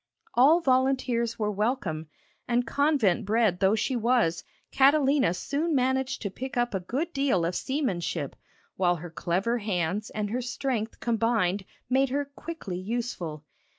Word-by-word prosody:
All 300 +8 +6
volunteers 255 -4 +1
were 210 -1 0
welcome, 205 - -1 0.4
and 245 0 +1
convent 280 - +2
bred 215 -3 +2
though 195 +3 +4
she 255 +4 -1
was, 230 -8 +2 0.3
Catalina 275 - +4
soon 300 - -1
managed 265 0 0
to 200 - -3
pick 265 +6 -6
up 240 -1 +1
a 195 - 0
good 280 - -3
deal 270 -12 +1
of 170 - -1
seamanship, 190 - -2 0.4
while 175 -2 +3
her 170 0 -8
clever 185 +9 0
hands 200 -1 -1
and 210 -1 -3
her 250 +2 -1
strength 235 -2 -3
combined 225 -5 +1 0.2
made 265 +1 +2
her 285 +2 -1
quickly 280 - -7
useful. 185 -8 -4
235 Hz, 145 wpm, -27 LUFS, 190-265 Hz, 0.4 s, All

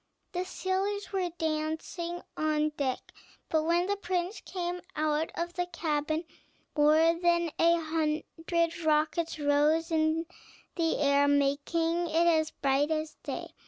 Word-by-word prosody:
The 360 0 -2
sailors 390 +3 -2
were 370 -2 0
dancing 320 +2 -3
on 305 0 +1
deck, 280 -4 -3 0.4
but 315 - +2
when 340 +2 +2
the 405 +1 -1
prince 365 0 -2
came 355 -1 -4
out 310 +1 0
of 345 +1 -3
the 355 0 -2
cabin, 315 -2 -1 0.5
more 310 +2 +5
than 340 -2 +2
a 335 +1 +5
hundred 325 +1 -1
rockets 315 +2 +1
rose 300 +3 +2
in 320 +1 +1 0.5
the 330 -2 +1
air, 285 0 +3
making 295 +5 +1
it 330 +1 +2
as 315 -2 +3
bright 275 +2 +1
as 310 -1 -1
day. - - -5
325 Hz, 130 wpm, -29 LUFS, 305-345 Hz, 0.5 s, more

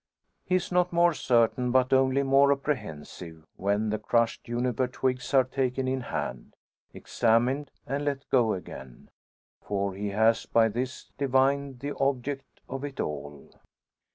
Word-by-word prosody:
He 185 - 0
is 185 0 -1
not 180 0 +2
more 170 0 +4
certain, 125 -2 +2
but 130 +1 +3
only 135 +1 +3
more 140 +1 +5
apprehensive, 90 - -4
when 105 +2 0
the 110 - -1
crushed 115 +1 0
juniper 125 +1 -1
twigs 130 0 -2
are 135 -2 +5
taken 130 0 -2
in 130 0 -1
hand, - - -5 0.4
examined, 125 +5 +1 0.2
and 140 +2 -2
let 140 -1 -2
go 120 -4 +3
again. 65 -8 -9 0.5
For 100 -1 -2
he 100 +2 -4
has 110 +3 +2
by 115 -1 +4
this 125 +4 -5
divined 135 -1 +1
the 145 +1 -4
object 135 0 -2
of 135 +1 -6
it 140 -2 -6
all. 70 -1 -5
130 Hz, 145 wpm, -27 LUFS, 110-135 Hz, 0.5 s, more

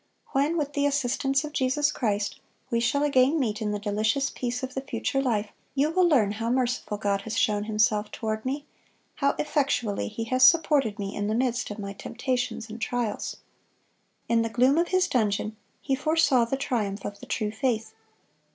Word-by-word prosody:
When, 290 +5 +1
with 290 -2 -2
the 285 0 +2
assistance 275 0 +1
of 300 -1 -6
Jesus 285 +3 +1
Christ, 205 -6 -1 0.3
we 235 - +2
shall 280 +5 +1
again 280 +2 +3
meet 220 -6 -1
in 215 - -1
the 210 - -1
delicious 215 +6 0
peace 250 +1 -3
of 260 0 -4
the 265 - -3
future 270 +1 -1
life, 220 -5 0 0.3
you 285 +3 +2
will 365 +1 +4
learn 225 -10 +4
how 225 +2 -3
merciful 245 -4 0
God 200 -1 0
has 220 - -4
shown 210 -4 +2
Himself 215 -1 +1
toward 220 0 -3
me, 280 +3 -3 0.5
how 280 0 +2
effectually 275 -8 0
He 220 +1 -4
has 255 +3 -1
supported 275 -5 +5
me 200 -1 -4
in 205 0 -2
the 215 - 0
midst 245 0 0
of 205 - -6
my 200 -1 -5
temptations 245 +1 -3
and 225 +1 -9
trials."(138) 240 -3 -2 0.9
In 230 -1 +3
the 230 - -1
gloom 255 +7 +3
of 345 - +2
his 370 -1 +2
dungeon 215 -2 0 0.3
he 275 - 0
foresaw 285 -4 +3
the 265 +4 -2
triumph 215 -7 -2
of 200 0 -6
the - - -11
true 215 -2 -1
faith. 220 -2 -1
245 Hz, 190 wpm, -26 LUFS, 215-275 Hz, 0.9 s, supported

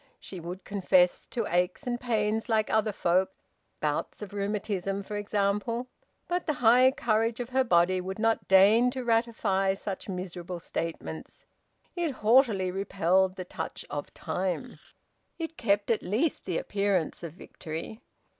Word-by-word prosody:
She 185 - -8
would 175 +3 -7
confess 185 -3 +2
to 230 -3 -2
aches 180 +9 0
and 240 -1 -2
pains 220 -2 0
like 220 -1 +1
other 220 0 +2
folk, 185 0 +2 0.5
bouts 150 +7 -2
of 205 - -9
rheumatism 200 -1 -2
for 210 - -6
example 205 +4 -1 0.4
but 355 0 -2
the 305 - +1
high 250 +2 +6
courage 225 -2 0
of 245 -1 -4
her 265 +1 +2
body 180 -4 +3
would 190 +1 -5
not 225 +1 +1
deign 205 +6 +6
to 260 - -4
ratify 225 -5 +1
such 195 0 -6
miserable 180 -1 -5
statements; 165 -1 -6 0.5
it 345 -2 0
haughtily 215 -5 +3
repelled 190 -1 +1
the 185 - -6
touch 165 -2 -6
of 145 0 -4
time; 185 +8 -3 0.6
it 325 -1 -5
kept 205 -3 +1
at 225 - +1
least 240 - -1
the 175 -3 -1
appearance 200 -5 -1
of 170 -3 -7
victory. 165 +4 -8
200 Hz, 145 wpm, -28 LUFS, 185-230 Hz, 0.6 s, high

